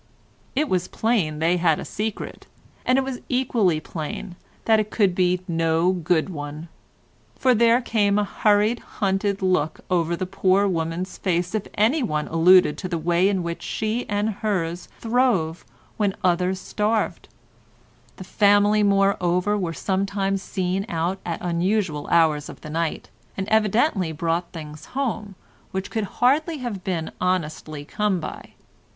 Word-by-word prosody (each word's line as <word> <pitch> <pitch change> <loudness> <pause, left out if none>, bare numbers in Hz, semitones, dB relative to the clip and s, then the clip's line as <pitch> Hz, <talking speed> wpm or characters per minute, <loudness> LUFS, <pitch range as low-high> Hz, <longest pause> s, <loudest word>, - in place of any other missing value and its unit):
It 300 +3 +1
was 180 -5 0
plain 205 -10 0
they 165 +3 +2
had 170 -3 +2
a - - -6
secret, 215 0 -5 0.4
and 255 - +4
it 270 - +2
was 265 -2 -5
equally 235 -10 +2
plain 165 +4 -6 0.3
that 220 -1 +5
it 215 0 -1
could 200 -5 +2
be 180 0 +1
no 165 +1 +2
good 175 -2 +1
one; 150 0 -7 0.7
for 255 -1 +3
there 235 +1 +4
came 205 -4 +1
a 210 - +3
hurried, 210 +3 +2
hunted 195 0 -1
look 180 -5 +1
over 170 -1 +1
the 185 - -3
poor 195 +1 +2
woman's 170 +1 -3
face 180 0 0
if 215 -2 -2
anyone 215 - +1
alluded 175 0 +5
to 185 - -4
the 170 - -1
way 175 +4 +2
in 190 -3 0
which 170 0 -4
she 220 +3 -2
and 205 +1 0
hers 175 -5 -2
throve 225 -9 +1 0.3
when 205 -3 +1
others 180 +1 +1
starved; 210 -2 -1 0.9
the - - -9
family, 205 +2 +4
moreover, 195 -1 +2
were 180 -5 -1
sometimes 195 +2 -1
seen 190 0 -2
out 170 +3 -1
at 170 - -2
unusual 175 -2 0
hours 155 -3 +3
of - - -11
the 155 - -8
night, 160 -9 -2 0.3
and 190 0 -2
evidently 215 - +2
brought 165 +2 -2
things 155 -2 -9
home, 215 -7 -2 0.3
which 190 0 -4
could 220 -2 -1 0.2
hardly 300 +6 +3
have 235 -8 -5
been 170 -4 -2
honestly 155 -4 -2
come 205 +2 0
by. 155 - -8
185 Hz, 150 wpm, -23 LUFS, 170-210 Hz, 0.9 s, that